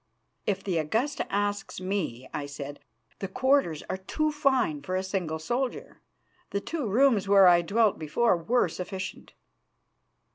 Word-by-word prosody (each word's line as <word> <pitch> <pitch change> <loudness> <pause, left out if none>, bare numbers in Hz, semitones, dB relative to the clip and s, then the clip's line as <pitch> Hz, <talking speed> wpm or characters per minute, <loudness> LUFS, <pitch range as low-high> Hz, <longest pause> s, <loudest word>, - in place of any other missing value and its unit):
"If 200 - 0
the 180 -4 0
Augusta 225 - -1
asks 205 -1 -1
me," 185 -10 -3
I 145 -1 -3
said, 145 0 -7 0.4
"the 195 - -3
quarters 255 - +1
are 185 - -2
too 305 +11 -1
fine 265 - +1
for 185 +6 -3
a 185 - 0
single 185 -5 -2
soldier. 240 +11 -3 0.5
The 200 - -1
two 295 +3 -3
rooms 225 -1 +3
where 195 -1 +7
I 175 -1 +6
dwelt 210 +4 +2
before 180 +8 +2
were 220 +9 +1
sufficient." 190 +1 -6
195 Hz, 145 wpm, -28 LUFS, 170-235 Hz, 0.5 s, where